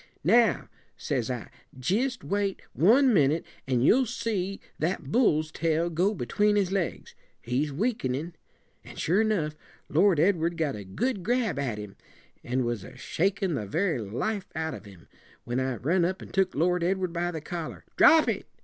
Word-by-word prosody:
'Now,' 225 +4 +4 0.3
says 130 -5 -2
I, 125 -3 -5 0.3
jist 230 - -1
wait 200 -1 -1
one 245 - +5
minute, 155 -2 +3 0.2
and 125 -1 +2
you'll 260 - +4
see 195 -4 -2 0.2
that 160 -3 -2
bull's 155 -10 +2
tail 165 +1 0
go 185 +6 +1
between 205 - +1
his 195 -3 +1
legs. 190 -4 -2 0.3
He's 130 +5 -1
weakenin'.' 165 - -2 0.5
An' - - -12
sure 185 +7 +2
enough, 180 -9 0 0.3
Lord 175 +1 +4
Edward 170 -1 +2
got 155 -4 -1
a 105 - -7
good 205 - -2
grab 230 - 0
at 125 -7 -2
him, 105 -2 -8 0.5
and 125 +1 -1
was 120 -5 -2
a - - -12
shakin' 190 +1 -1
the 105 -8 -3
very 165 - 0
life 185 - -3
out 160 0 -2
of - - -9
him, 95 -5 -15 0.4
when 120 +1 -2
I 130 -1 -1
run 170 +10 +1
up 185 +2 -1
and - - -11
took 190 -1 +1
Lord 175 +3 +1
Edward 185 -1 0
by 175 0 -1
the 165 -2 -4
collar. 165 +1 -6
'Drop 320 -1 +6
it!' - - -2
170 Hz, 170 wpm, -27 LUFS, 135-200 Hz, 0.5 s, Drop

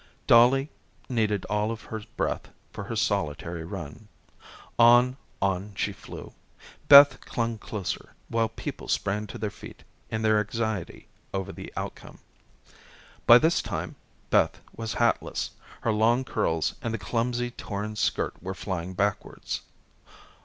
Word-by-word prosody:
Dollie 130 +5 +5 0.4
needed 105 -5 0
all 105 +1 0
of 115 -1 -5
her 110 -1 -6 0.2
breath - - -1 0.2
for - - -6
her - - -4
solitary 85 +3 -1
run. 85 +2 -8 0.7
On, 120 +2 +7 0.3
on, 100 +1 -1
she - - -1
flew. - - -10 0.5
Beth 140 0 +9
clung 115 -2 -2
closer, 105 -3 -5
while 115 -1 +1
people 115 - -7
sprang 105 +2 -1
to 105 - -8
their 105 -1 -3
feet - - -12 0.3
in 110 0 -2
their 110 -1 +4
anxiety 105 -2 -3 0.3
over 95 -1 -2
the - - -9
outcome. - - -6 1.1
By 120 - +11
this 160 +6 +3
time 90 -5 -4 0.4
Beth - - +3 0.2
was 115 0 -4
hatless. 120 0 0 0.3
Her 115 - +1
long 115 +4 +3
curls 80 -10 0
and 115 -1 -2
the - - -2
clumsy 120 +3 -1
torn 105 -1 -5
skirt - - 0
were 95 +2 -5
flying 95 -2 -4
backwards. 100 +1 -2
110 Hz, 135 wpm, -27 LUFS, 100-115 Hz, 1.1 s, By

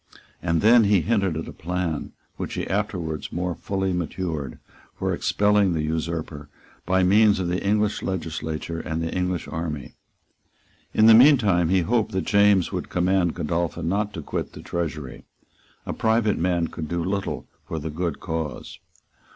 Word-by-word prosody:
And 85 -2 +1
then 115 +1 +6
he 100 -3 +4
hinted 100 -7 +1
at 80 - -5
a - - -8
plan 85 -2 -3 0.2
which - - -5
he - - -2
afterwards 90 -6 -2
more 90 +1 -2
fully 95 +1 -2
matured, 80 -6 -3 0.4
for - - -1
expelling 105 -2 +2
the 80 -2 -1
usurper 80 -2 -3 0.4
by 95 +1 +3
means 105 +2 +5
of 90 -2 -1
the 90 +1 -1
English 105 +1 +1
legislature 80 -2 -4
and 80 0 -3
the 80 - -3
English 90 -1 -1
army. 80 -4 -5 1.0
In 110 - +4
the 115 - +9
meantime 110 - +6
he 95 0 +3
hoped 110 +3 0
that 95 - -1
James 100 -3 +4
would - - -4
command 90 -1 +1
Godolphin 85 +1 -2
not 105 +2 0
to 80 - -5
quit - - -4
the - - -10
Treasury. 75 -7 -4 0.6
A - - -3
private 110 -1 +1
man 85 -1 +1
could 80 -2 -6
do 85 +1 -2
little 95 +2 -3 0.2
for 80 - -4
the 80 0 -4
good 85 0 -3
cause. 80 -2 -5
90 Hz, 160 wpm, -24 LUFS, 80-100 Hz, 1.0 s, the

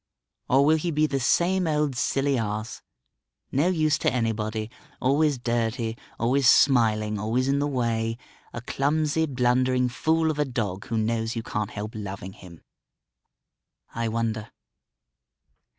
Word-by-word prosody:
Or 135 +2 +4
will 155 +2 +4
he 170 +3 -2
be 155 -1 +2
the 140 -2 -1
same 180 +7 +2
old 150 -3 0
silly 135 +3 +1
ass, 110 -2 -3 0.7
no 145 +6 +2
use 155 -5 +2
to - - +1
anybody, 110 -2 -2 0.3
always 145 +2 +2
dirty, 115 -1 -1 0.2
always 125 +3 +3
smiling, 110 -6 +3
always 115 +5 0
in 140 +1 +2
the 145 - 0
way, 115 -4 -1 0.3
a 115 - -6
clumsy, 150 +5 0
blundering 125 -1 +1
fool 160 +4 +1
of 150 - -6
a - - +4
dog 105 -7 -3
who 115 - -2
knows 115 +1 -1
you 115 - -3
can't 105 -2 -3
help 105 +1 -6
loving 95 -3 -6
him? 85 -4 -14 1.3
I 115 0 -2
wonder.... 110 -1 -2
125 Hz, 140 wpm, -25 LUFS, 110-145 Hz, 1.3 s, Or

